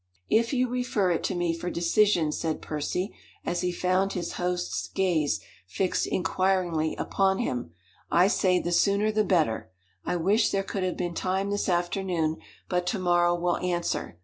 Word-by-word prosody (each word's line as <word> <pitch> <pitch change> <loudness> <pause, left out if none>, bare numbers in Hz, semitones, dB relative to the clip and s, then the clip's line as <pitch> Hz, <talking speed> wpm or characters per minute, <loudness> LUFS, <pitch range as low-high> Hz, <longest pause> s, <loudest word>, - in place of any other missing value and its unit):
"If 230 +1 +3
you 255 -2 +2
refer 240 -6 0
it 170 - 0
to 190 - -1
me 175 -1 0
for 175 +2 -4
decision," 175 -1 +2
said 160 0 -2
Percy, 160 +6 -3 0.3
as 175 - -1
he 180 -1 0
found 185 +2 +1
his 180 - -3
host's 180 0 -2
gaze 175 -6 +1 0.3
fixed 185 - 0
inquiringly 180 -3 0
upon 190 -1 +1
him, 125 - -2 0.4
"I 175 +2 +5
say 185 -3 +2
the 175 - -3
sooner 200 +4 +3
the 215 0 +2
better. 165 - +1 0.3
I 180 - -1
wish 200 +6 +3
there 195 0 0
could 195 0 -4
have 185 -1 -1
been 175 -1 -2
time 190 +3 -1
this 205 -1 -1
afternoon, 175 -2 0 0.3
but 180 -1 -1
to 205 - 0
morrow 175 -1 +3
will 175 0 0
answer. 175 - -2
180 Hz, 170 wpm, -27 LUFS, 175-195 Hz, 0.4 s, I